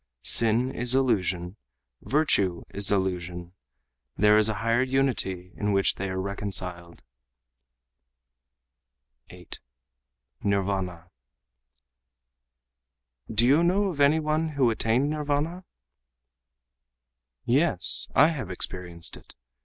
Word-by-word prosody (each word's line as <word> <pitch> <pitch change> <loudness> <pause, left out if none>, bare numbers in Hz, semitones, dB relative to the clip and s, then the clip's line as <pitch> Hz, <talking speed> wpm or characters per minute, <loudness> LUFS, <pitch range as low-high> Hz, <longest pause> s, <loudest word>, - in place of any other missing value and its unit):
Sin 115 +3 +3
is 125 +1 +1
illusion; 95 -7 -1 0.4
virtue 100 - 0
is 100 0 +1
illusion, 90 -2 -3 0.6
There 105 +2 +4
is 110 0 +4
a 110 - -2
higher 115 +3 0
unity 130 -9 -1
in 105 -1 -1
which 95 0 +2
they 95 0 -5
are 95 0 -3
reconciled." 95 -3 -5 2.3
8. 90 -1 -12 0.8
Nirvâna 95 -3 -2 2.2
"Do 110 +2 +3
you 145 +6 +4
know 195 +3 +1
of 160 -6 -7
any 145 +3 +4
one 155 +1 -1
who 135 -6 +1
attained 120 +6 0
Nirvâna?" 150 +4 -3 1.8
"Yes, 130 - +2
I 150 +3 +6
have 135 - -5
experienced 90 -2 -3
it. - - -16
105 Hz, 100 wpm, -26 LUFS, 95-140 Hz, 2.3 s, I